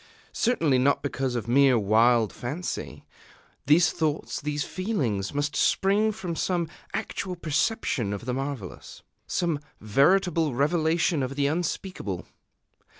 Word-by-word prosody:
Certainly 160 Hz, -, +2 dB
not 140 Hz, +3 st, +2 dB
because 135 Hz, -3 st, -2 dB
of 120 Hz, -1 st, -3 dB
mere 130 Hz, +1 st, +5 dB
wild 110 Hz, +2 st, +3 dB
fancy. 145 Hz, +9 st, -5 dB, 0.6 s
These 160 Hz, +3 st, +5 dB
thoughts, 155 Hz, -2 st, -2 dB
these 150 Hz, 0 st, -2 dB
feelings, 135 Hz, -, -2 dB
must 145 Hz, +1 st, -2 dB
spring 205 Hz, +3 st, +2 dB
from 180 Hz, -5 st, -5 dB
some 175 Hz, 0 st, 0 dB, 0.2 s
actual 185 Hz, -2 st, -4 dB
perception 155 Hz, -, -1 dB
of 100 Hz, +2 st, -5 dB
the 125 Hz, -, -2 dB
marvellous, 135 Hz, -7 st, -6 dB, 0.2 s
some 170 Hz, -5 st, 0 dB, 0.2 s
veritable 160 Hz, -, +2 dB
revelation 160 Hz, +3 st, +1 dB
of 130 Hz, +1 st, -3 dB
the 140 Hz, 0 st, +1 dB
unspeakable. 160 Hz, -, -3 dB
145 Hz, 120 wpm, -26 LUFS, 125-175 Hz, 0.6 s, mere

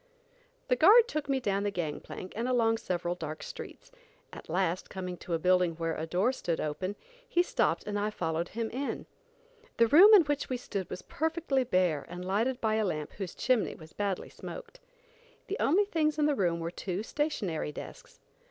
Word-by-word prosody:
The 250 Hz, -, +3 dB
guard 430 Hz, -, +7 dB
took 305 Hz, -9 st, -3 dB
me 270 Hz, -1 st, +2 dB
down 200 Hz, -5 st, 0 dB
the 205 Hz, -, 0 dB
gang 170 Hz, -6 st, -3 dB
plank, 185 Hz, -, -9 dB
and 230 Hz, +3 st, -2 dB
along 230 Hz, -3 st, +3 dB
several 175 Hz, -1 st, -2 dB
dark 155 Hz, -3 st, -6 dB
streets. -, -, -9 dB, 0.4 s
At -, -, -10 dB
last, 180 Hz, +1 st, 0 dB
coming 180 Hz, -1 st, -5 dB
to 170 Hz, -, -3 dB
a -, -, +1 dB
building 180 Hz, 0 st, +3 dB
where 165 Hz, 0 st, -2 dB
a 160 Hz, -, -4 dB
door 185 Hz, +9 st, +2 dB
stood 170 Hz, -10 st, -2 dB
open, 185 Hz, +6 st, -3 dB, 0.3 s
he 350 Hz, -7 st, +3 dB
stopped -, -, 0 dB
and 205 Hz, 0 st, -2 dB
I 210 Hz, +1 st, 0 dB
followed 165 Hz, -4 st, -2 dB
him 225 Hz, 0 st, -3 dB
in. 270 Hz, +3 st, -3 dB, 0.7 s
The 230 Hz, -, +6 dB
room 345 Hz, -, +8 dB
in 380 Hz, -, +7 dB
which 290 Hz, -1 st, -2 dB
we 255 Hz, -, -1 dB
stood 200 Hz, -6 st, -5 dB
was 185 Hz, -, -6 dB
perfectly 320 Hz, -4 st, 0 dB
bare 180 Hz, -, +1 dB
and 180 Hz, +1 st, -7 dB
lighted 225 Hz, +7 st, 0 dB
by 220 Hz, -2 st, +1 dB
a 220 Hz, -, +1 dB
lamp 155 Hz, -5 st, -3 dB
whose 190 Hz, -3 st, -5 dB
chimney 245 Hz, -1 st, +1 dB
was 160 Hz, -1 st, -14 dB
badly 200 Hz, -3 st, -2 dB
smoked. -, -, -9 dB, 0.7 s
The 405 Hz, -, -3 dB
only 375 Hz, +9 st, +3 dB
things 310 Hz, -5 st, 0 dB
in 300 Hz, -, +3 dB
the 300 Hz, -, +3 dB
room 175 Hz, -8 st, +1 dB
were 165 Hz, 0 st, -3 dB
two 185 Hz, +2 st, -4 dB
stationary 215 Hz, -, -2 dB
desks. -, -, -10 dB
205 Hz, 195 wpm, -30 LUFS, 175-275 Hz, 0.7 s, room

